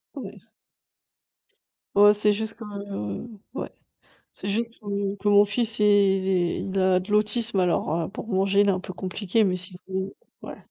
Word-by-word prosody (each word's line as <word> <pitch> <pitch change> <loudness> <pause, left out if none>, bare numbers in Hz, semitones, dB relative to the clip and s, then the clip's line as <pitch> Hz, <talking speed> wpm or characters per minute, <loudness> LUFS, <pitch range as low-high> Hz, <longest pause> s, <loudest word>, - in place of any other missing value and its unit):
Ouais. - - -8 1.6
Oh, 205 +1 +7
c'est 210 0 +2
juste 220 +1 -4
que 230 - -11 0.9
ouais. - - -4 0.6
C'est 195 - -7
juste 230 +3 -1
que 200 -1 -3
que 205 +1 -2
mon 205 0 +7
fils 220 +2 -1
il 210 - +3
est 190 -3 +3
il 195 0 -3
a 185 -1 +4
de 185 - -10
l'autisme 210 0 +1
alors 175 -3 +1
heu, 165 -2 -2
pour 215 - -8
manger 195 -1 +2
il 205 - +4
est - - +6
un 185 - -2
peu 185 - -8
compliqué 195 +3 0
mais 185 -2 +1
sinon 190 +1 -5 0.3
ouais. - - -8
200 Hz, 170 wpm, -25 LUFS, 190-210 Hz, 1.6 s, Oh